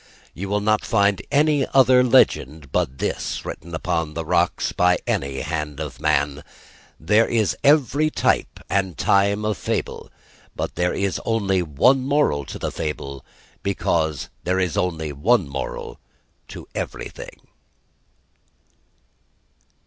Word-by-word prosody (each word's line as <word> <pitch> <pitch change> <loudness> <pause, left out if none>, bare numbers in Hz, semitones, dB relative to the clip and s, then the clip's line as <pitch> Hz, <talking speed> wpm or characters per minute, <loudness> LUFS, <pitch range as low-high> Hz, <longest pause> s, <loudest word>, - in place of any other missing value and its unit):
You 95 +3 -6
will 105 +1 0
not 110 +1 +2
find 100 -3 +2
any 145 -1 +3
other 130 -1 +6
legend 75 - +2
but 65 - -1
this - - -3
written 85 0 -7
upon 80 -2 -2
the 80 0 -3
rocks - - +1
by 90 0 +3
any 70 -1 -2
hand 75 -2 -4
of 75 -2 -6
man. 75 -1 0 0.6
There 105 +8 +3
is 110 -4 +1
every 145 +1 +4
type - - 0
and 95 -4 -1
time 100 +2 +2
of 105 -2 -1
fable: - - -3 0.5
but - - -3
there 90 0 0
is 100 -1 -1
only 100 -5 +1
one 90 - +3
moral 135 - +1
to - - -7
the - - -3
fable; 70 -3 -5 0.4
because 80 -6 -1
there 90 +1 0
is 90 -4 0
only 80 -4 -1
one 95 - +2
moral 70 -3 -6 0.5
to - - -10
everything_. - - -6
90 Hz, 130 wpm, -22 LUFS, 75-110 Hz, 0.6 s, other